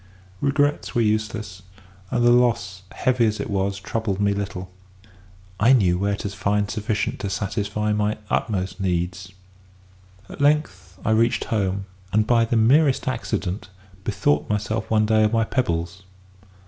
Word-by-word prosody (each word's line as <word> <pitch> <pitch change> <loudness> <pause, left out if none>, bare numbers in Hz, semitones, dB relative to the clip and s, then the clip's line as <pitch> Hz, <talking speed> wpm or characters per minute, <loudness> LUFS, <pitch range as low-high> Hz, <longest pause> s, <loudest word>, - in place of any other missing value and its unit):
"Regrets 145 +1 0
were 120 - +3
useless, 105 -3 -1 0.5
and 120 -1 +1
the 120 - +6
loss, 115 -7 +2
heavy 125 -2 +2
as 110 0 -2
it - - -4
was, 100 0 -1
troubled 100 -1 -2
me 100 0 +2
little; 95 -2 -5 0.9
I 115 +5 +6
knew 90 -8 +3
where 100 +1 0
to 100 - -4
find 100 0 -1
sufficient 105 -1 -2
to 100 - -3
satisfy 105 +1 -1
my 105 0 0
utmost 95 -5 -1
needs. 90 0 -2 1.0
At - - -9
length 95 - +1
I 110 - +2
reached 115 +2 +2
home, 100 -3 -1 0.3
and, 110 +1 +3
by 115 -1 +3
the 115 +1 0
merest 135 +6 +4
accident, 105 -6 -3 0.3
bethought 95 -9 0
myself 105 +1 -2
one 110 -1 +3
day 110 0 +3
of 105 +1 +2
my 115 0 +3
pebbles. 85 -7 -2
105 Hz, 150 wpm, -23 LUFS, 95-115 Hz, 1.0 s, the